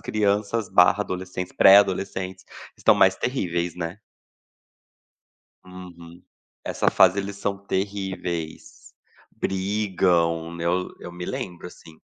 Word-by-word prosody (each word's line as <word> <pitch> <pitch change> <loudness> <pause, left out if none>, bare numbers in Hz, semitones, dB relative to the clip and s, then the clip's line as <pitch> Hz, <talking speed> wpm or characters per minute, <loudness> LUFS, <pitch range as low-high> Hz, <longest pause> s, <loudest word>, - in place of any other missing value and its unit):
crianças 105 +1 -1
/ 90 +3 +4
adolescentes, 90 -1 -6
pré-adolescentes 95 -1 +3 0.3
estão - - +4
mais - - +4
terríveis, 90 -9 -2
né? 85 +2 -5 1.7
Uhum, 90 -2 -12 0.4
essa - - 0
fase, 95 +1 +4
eles 100 0 -4
são 100 0 -2
terríveis. 95 -4 -5 0.4
Brigam, 90 -4 0
né? 85 - -5 0.4
Eu - - -8
me 90 0 -7
lembro, 95 -10 -6
assim. 80 -2 -15
95 Hz, 100 wpm, -24 LUFS, 85-100 Hz, 1.7 s, /